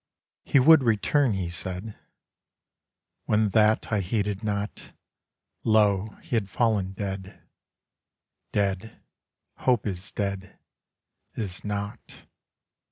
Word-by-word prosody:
He 140 - +4
would 155 +3 +7
return, 115 +3 +2
he 90 -3 -2
said. 95 +4 -4 1.3
When 105 0 +2
that 110 +2 +3
I 105 - +3
heeded 100 +2 -1
not, 105 -1 -4 0.7
Lo, 105 -2 +3
he - - -3
had 105 -4 0
fallen 100 -3 +1
dead. 95 -1 -6 1.1
Dead; 100 +2 -1 0.6
Hope 125 -5 +1
is 95 -1 -4
dead; 100 -2 -4 0.8
is 95 -5 -4
not. 100 -1 -6
105 Hz, 100 wpm, -26 LUFS, 95-110 Hz, 1.3 s, would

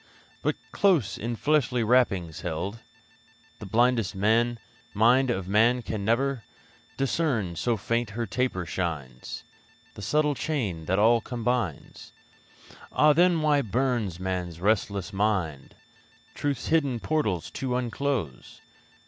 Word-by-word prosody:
But, - - 0 0.2
close 160 - +2
in 120 +2 -3
fleshly 130 -3 +1
wrappings 100 -9 +2
held, 90 +6 -4 0.8
The 105 - -8
blinded 115 0 +2 0.8
mind 125 +5 +4
of 95 -6 -2
man 115 +5 +3
can 105 -3 -4
never 120 +3 +1 0.5
Discern 130 - 0
so 115 +8 0
faint 115 +2 -1
her 115 +3 -3
taper 110 -4 -1
shines 75 -9 -4 0.5
The - - -10
subtle 150 +8 +1
chain 110 - -3
that 95 +4 +1
all 115 +3 +4
combines? 120 - -3 0.8
Ah! 150 0 +5
then 170 0 +3
why 150 -2 +3
burns 115 -6 -1
man's 90 -3 -3
restless 100 -2 0
mind 95 -9 -1 0.6
Truth's 140 -4 -2
hidden 140 -7 +2
portals 110 - -1
to 130 -2 -3
unclose? 125 - -3
115 Hz, 115 wpm, -27 LUFS, 95-130 Hz, 0.8 s, Ah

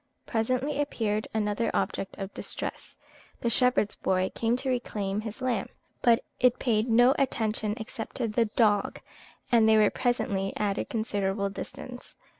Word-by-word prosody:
Presently 255 +5 0
appeared 215 -7 -1
another 215 +1 0
object 195 - -2
of 195 -1 -6
distress. - - -5 0.4
The 235 - +1
shepherd's 250 -4 +3
boy 185 0 0
came 230 +1 +1
to 265 +1 -2
reclaim 210 -5 -1
his 220 +3 -7
lamb; 240 -6 0 0.3
but 235 -1 +4 0.2
it 250 0 +4
paid 230 -1 +1
no 245 +3 +6
attention 220 -5 0
except 220 0 -7
to 245 -3 0
the 230 +2 +2
dog, 210 -2 +2 0.5
and 225 -2 +5
they 220 - +6
were 210 -1 +5
presently 200 -6 0
at 205 -1 0
a - - -1
considerable 200 -3 -1
distance. 245 +4 -8
220 Hz, 150 wpm, -28 LUFS, 205-245 Hz, 0.5 s, no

